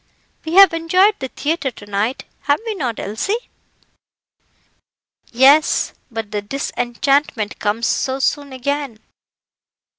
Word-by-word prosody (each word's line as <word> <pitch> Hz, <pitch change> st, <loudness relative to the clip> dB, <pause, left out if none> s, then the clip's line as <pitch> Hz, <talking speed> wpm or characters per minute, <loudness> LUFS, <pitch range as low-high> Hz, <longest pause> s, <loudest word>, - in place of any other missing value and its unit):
We 320 Hz, +2 st, -3 dB
have 390 Hz, -2 st, +8 dB
enjoyed 365 Hz, +5 st, +2 dB
the 265 Hz, -, -4 dB
theatre 295 Hz, +2 st, -2 dB
to 215 Hz, -4 st, -13 dB
night, 205 Hz, +5 st, -2 dB, 0.2 s
have 285 Hz, 0 st, +2 dB
we 450 Hz, -, -2 dB
not, 255 Hz, -, -3 dB
Elsie?" 220 Hz, -, -2 dB, 1.9 s
"Yes, 275 Hz, +5 st, +4 dB, 0.2 s
but 225 Hz, -3 st, -6 dB
the 210 Hz, -, -2 dB
disenchantment 245 Hz, 0 st, -1 dB
comes 220 Hz, +3 st, -1 dB
so 260 Hz, +2 st, 0 dB
soon 285 Hz, +1 st, -1 dB
again." 275 Hz, -1 st, -3 dB
270 Hz, 115 wpm, -19 LUFS, 230-305 Hz, 1.9 s, have